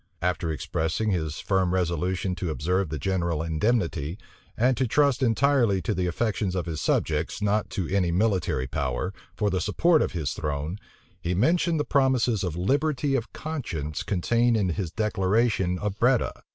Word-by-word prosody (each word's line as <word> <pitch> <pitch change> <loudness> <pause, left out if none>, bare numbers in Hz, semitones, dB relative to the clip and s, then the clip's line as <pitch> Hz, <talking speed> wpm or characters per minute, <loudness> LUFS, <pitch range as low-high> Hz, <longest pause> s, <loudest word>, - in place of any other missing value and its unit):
After 90 -2 0
expressing 80 +7 -1
his 80 -5 -2
firm 95 -2 +1
resolution 90 +1 0
to 90 - -2
observe 90 +4 0
the 75 - -3
general 85 -3 -1
indemnity, 85 - 0 0.4
and 125 +3 +3
to 130 - +1
trust 140 +2 +2
entirely 120 -4 +3
to - - 0
the 90 0 -1
affections 95 0 -1
of 90 - -1
his 80 -3 -4
subjects, 75 +6 0
not 105 0 0
to 90 -4 -3
any 90 -3 +1
military 90 -8 +1
power, 70 +6 -2 0.2
for 105 -1 0
the 95 -1 0
support 160 - +3
of - - -1
his 80 -6 -2
throne, 75 +5 -3 0.4
he 90 +1 -1
mentioned 165 - +2
the - - +2
promises 130 -6 +2
of 90 -4 -2
liberty 140 - +1
of 120 -4 -1
conscience 85 - -4
contained 115 +5 +1
in 100 -4 +1
his 85 +1 -2
declaration 105 -2 +1
of 105 +1 -4
Breda. 125 +1 +3
95 Hz, 165 wpm, -26 LUFS, 85-115 Hz, 0.4 s, and